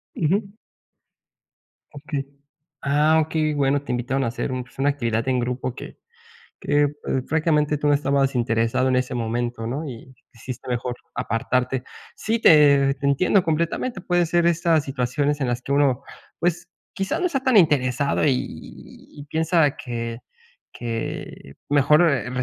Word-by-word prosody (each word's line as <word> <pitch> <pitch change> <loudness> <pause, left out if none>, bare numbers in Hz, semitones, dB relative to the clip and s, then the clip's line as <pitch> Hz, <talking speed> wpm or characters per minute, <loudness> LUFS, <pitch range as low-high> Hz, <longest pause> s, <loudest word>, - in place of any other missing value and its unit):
Ujú. 195 +5 0 1.4
Okey. 145 -1 -5 0.6
Ah, 150 +3 +3
okey, 155 -1 -1
bueno, 140 0 +1
te 145 - -6
invitaron 125 +2 -1
a - - 0
hacer 120 +3 -3
un, 130 -1 -3
pues, 120 - -22
una 145 +1 +3
actividad 115 -4 -1
en 130 -1 +1
grupo 125 0 -3
que - - -10 0.7
que, 145 0 +3
eh, 145 - +2 0.4
francamente, 150 -1 +1
tú 150 - 0
no 145 - +4
estabas 140 -1 +1
interesado 115 +2 +1
en 130 - +2
ese 125 0 -1
momento, 120 0 -2
¿no?, 135 +7 -3
y 125 +2 -11 0.2
sí 120 +3 -8
está 125 - -9
mejor 120 0 -2 0.2
apartarte. 125 +3 -1 0.3
Sí, 225 +1 -1
te 140 -6 +6
te 140 - -3
entiendo 180 +7 +3
completamente. 170 +8 -1
Puede 175 -2 +1
ser 170 0 +2
estas 165 -2 +2
situaciones 140 +2 -1
en 135 - 0
las 120 +1 -2
que 140 - -5
uno, 140 -2 +2 0.3
pues, 175 0 -1 0.2
quizá 195 0 -2
no 365 - 0
está 315 -7 0
tan 255 -5 +4
interesado 140 -4 +2
y 150 - +4
y 145 - -9
y - - -10
piensa 160 -1 +1
que 115 -1 -5 0.5
que 115 - -6
mejor, 150 +4 +4
eh, 130 -3 -1
140 Hz, 160 wpm, -23 LUFS, 125-155 Hz, 1.4 s, te